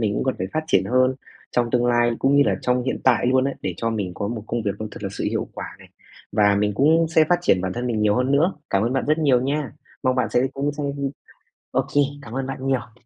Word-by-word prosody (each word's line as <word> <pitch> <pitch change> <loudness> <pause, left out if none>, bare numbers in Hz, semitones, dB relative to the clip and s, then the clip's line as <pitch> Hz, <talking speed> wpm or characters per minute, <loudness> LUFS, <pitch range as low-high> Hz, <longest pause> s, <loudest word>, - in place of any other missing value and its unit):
mình 105 -3 0
cũng - - -1
cần 130 - 0
phải 95 - -2
phát 155 0 -1
triển 95 -10 +3
hơn 130 +4 +2 0.4
trong 120 -1 0
tương 120 -1 +2
lai 120 0 +3
cũng 140 +1 +3
như 145 - +7
là - - +2
trong 125 0 +1
hiện 130 - -2
tại 125 -2 +3
luôn 130 +1 +3
ấy, 140 - -1
để 90 - -2
cho 115 0 -1
mình 100 -5 -3
có 100 - -3
một 115 -3 -4
công 120 -1 -2
việc 100 - 0
nó 110 - -4
thật - - -10
là 100 - -2
sự - - -4
hiệu - - -2
quả - - -5
này - - -16 0.4
và 105 -1 +4
mình 105 0 +1
cũng 160 +5 +4
sẽ 160 -1 +4
phát 175 - +3
triển 95 - +2
bản 95 0 -2
thân 120 +3 -3
mình 115 -3 -1
nhiều 105 -1 +3
hơn 125 +2 +1
nữa. 165 +7 +3 0.2
Cảm 100 +1 +2
ơn 120 +3 0
bạn 135 - 0
rất 155 +2 +2
nhiều 135 -6 +3
nha! 140 0 -2 0.3
Mong 130 0 +2
bạn 125 - 0
sẽ 125 +2 +2
cũng 140 +1 -1
sẽ 145 0 -5 0.9
OK, - - 0 0.3
cảm 115 -3 -10
ơn 135 0 -2
bạn 135 0 -5
nhiều. 120 -2 -3
125 Hz, 275 wpm, -22 LUFS, 110-135 Hz, 0.9 s, như